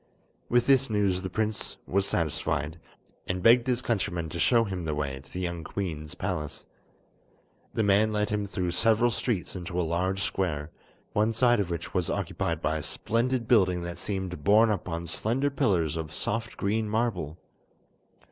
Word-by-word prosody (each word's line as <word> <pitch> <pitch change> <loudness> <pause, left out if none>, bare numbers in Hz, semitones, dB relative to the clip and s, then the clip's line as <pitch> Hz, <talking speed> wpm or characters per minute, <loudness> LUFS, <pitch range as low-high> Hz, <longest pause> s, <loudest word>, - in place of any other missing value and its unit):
With 120 0 +3
this 135 -1 +4
news 100 -4 +1
the 95 - -4
prince 110 +2 -2
was 100 +1 +1
satisfied, 80 0 -1 0.5
and 90 0 -2
begged 120 +2 +6
his 125 -1 +1
countryman 95 -8 -1
to 85 - -5
show 115 +9 +4
him 95 -5 -4
the 75 -2 -2
way 70 -3 -3
to 65 0 -18
the 90 - -4
young 85 -2 -3
queen's 80 -5 -4
palace. 75 -1 -4 1.1
The 110 - +2
man 105 +2 +4
led 105 0 0
him 105 -1 -1
through 90 -3 -2
several 115 +6 +3
streets 110 -5 -2
into 90 0 -4
a - - +2
large 95 +4 0
square, 80 -5 -2 0.4
one 110 +2 +2
side 120 +1 +4
of 100 -3 0
which 85 -2 -4
was - - 0
occupied 85 -1 -2
by 80 0 +1
a - - -5
splendid 115 - 0
building 90 -7 +3
that 85 0 -5
seemed 95 -6 -4
borne 110 +5 +5
up 95 -3 -2
on 85 0 -3
slender 120 - 0
pillars 95 - +1
of 80 -2 -4
soft 115 +1 -3
green 105 +2 0
marble. 105 -9 -1
95 Hz, 175 wpm, -28 LUFS, 85-110 Hz, 1.1 s, begged